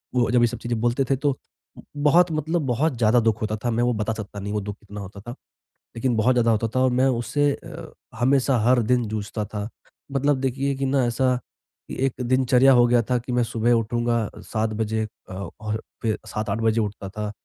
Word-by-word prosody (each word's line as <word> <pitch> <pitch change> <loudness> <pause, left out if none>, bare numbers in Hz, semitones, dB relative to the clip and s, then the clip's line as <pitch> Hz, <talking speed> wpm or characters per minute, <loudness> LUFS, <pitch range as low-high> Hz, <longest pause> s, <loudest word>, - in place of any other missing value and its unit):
वो 125 -1 +2
जब 125 - +4
ये 120 - +5
सब 120 - -5
चीज़ें 120 -1 -3
बोलते 120 +3 +1
थे 135 - +3
तो 140 0 0 0.6
बहुत 165 +4 +4
मतलब 155 +2 -1
बहुत 130 +3 0
ज़्यादा 115 +1 +4
दुःख 110 -1 +1
होता 110 0 -1
था, 120 - +2
मैं 115 +1 +1
वो 120 0 +2
बता 110 0 -1
सकता 105 -1 -7
नहीं 100 +1 -4
वो 105 - -1
दुःख 100 0 -6
कितना 105 -1 -9
होता 100 +1 -9
था। 120 +4 -8 0.6
लेकिन 120 +1 0
बहुत 125 +4 +3
ज़्यादा 115 -1 +3
होता 115 +1 +1
था - - +3
और 130 - +3
मैं 130 +2 +2
उसे 130 +4 +1
अ, - - -9 0.3
हमेशा 130 +1 +3
हर 120 +2 +4
दिन 125 +2 +2
जूझता 105 0 -3
था, 105 +1 -5 0.4
मतलब 140 +1 +2
देखिए 135 +1 0
कि 135 +1 -2
ना 135 0 +2
ऐसा, 125 +1 +1 0.5
एक 135 -1 -1
दिनचर्या 130 +1 +4
हो 120 - +6
गया 120 0 +4
था 125 - +4
कि 125 +1 -7
मैं 125 0 +2
सुबह 115 +1 +1
उठूँगा 120 +1 +1 0.4
7 110 0 +1
बजे 110 0 -1 0.3
अ, - - -7 0.3
और 110 0 -2 0.2
फिर 110 -2 0
7-8 105 -1 -2
बजे 115 0 +2
उठता 105 -2 -4
था, 105 +1 -4
120 Hz, 215 wpm, -24 LUFS, 110-130 Hz, 0.6 s, हो